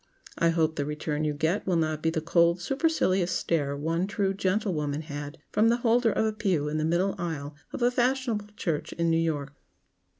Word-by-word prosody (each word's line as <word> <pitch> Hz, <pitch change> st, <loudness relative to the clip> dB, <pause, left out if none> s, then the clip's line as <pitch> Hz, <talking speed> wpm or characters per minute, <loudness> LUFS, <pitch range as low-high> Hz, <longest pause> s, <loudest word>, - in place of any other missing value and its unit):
I 170 Hz, -, +4 dB
hope 160 Hz, -1 st, +1 dB
the 145 Hz, -, 0 dB
return 150 Hz, 0 st, -2 dB
you 150 Hz, -, 0 dB
get 160 Hz, +8 st, 0 dB
will 185 Hz, -, +2 dB
not 155 Hz, -2 st, 0 dB
be 160 Hz, -, +2 dB
the 160 Hz, -1 st, -1 dB
cold 170 Hz, +2 st, +3 dB
supercilious 195 Hz, -, +1 dB
stare 145 Hz, -5 st, 0 dB
one 165 Hz, +5 st, -1 dB
true 200 Hz, -2 st, 0 dB
gentlewoman 185 Hz, -7 st, -1 dB
had 145 Hz, 0 st, -6 dB
from 225 Hz, +2 st, +4 dB
the 235 Hz, -, +3 dB
holder 235 Hz, -1 st, +3 dB
of 220 Hz, -, +1 dB
a 220 Hz, -, 0 dB
pew 185 Hz, -9 st, 0 dB
in 155 Hz, +1 st, -1 dB
the 155 Hz, -, 0 dB
middle 175 Hz, +4 st, +1 dB
aisle 155 Hz, -4 st, -4 dB, 0.2 s
of -, -, -3 dB
a 245 Hz, -, +4 dB
fashionable 245 Hz, -4 st, 0 dB
church 160 Hz, -5 st, -2 dB
in 170 Hz, 0 st, 0 dB
New 165 Hz, -, +3 dB
York. 145 Hz, -4 st, -2 dB
170 Hz, 200 wpm, -27 LUFS, 155-205 Hz, 0.2 s, I